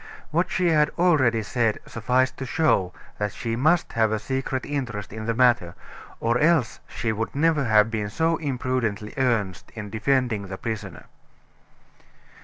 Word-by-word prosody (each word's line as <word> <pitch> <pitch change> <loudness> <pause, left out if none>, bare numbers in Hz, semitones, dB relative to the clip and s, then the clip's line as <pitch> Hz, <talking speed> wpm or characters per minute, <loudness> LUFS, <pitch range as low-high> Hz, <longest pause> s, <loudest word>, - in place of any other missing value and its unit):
What 170 +4 +1
she 180 -2 +1
had 150 -2 +4
already 140 -11 +3
said 115 0 0
sufficed 125 +3 0
to 135 - -5
show 115 - +2 0.3
that 105 -1 -1
she 115 -1 -3
must 155 +8 +2
have 110 -1 +2
a 110 - +1
secret 130 +3 -3
interest 120 -9 -4
in 110 0 -6
the 115 - 0
matter, 120 -8 +3 0.4
or 115 +1 +1
else 155 -6 +2
she 115 0 -2
would 110 +3 -3
never 155 -1 +2
have 110 0 +4
been 105 -2 -2
so 165 +8 +1
imprudently 125 -7 -2
earnest 115 -8 -1
in 105 -3 -7
defending 115 -3 0
the 95 0 -6
prisoner. 105 -7 -6
115 Hz, 155 wpm, -24 LUFS, 110-140 Hz, 0.4 s, had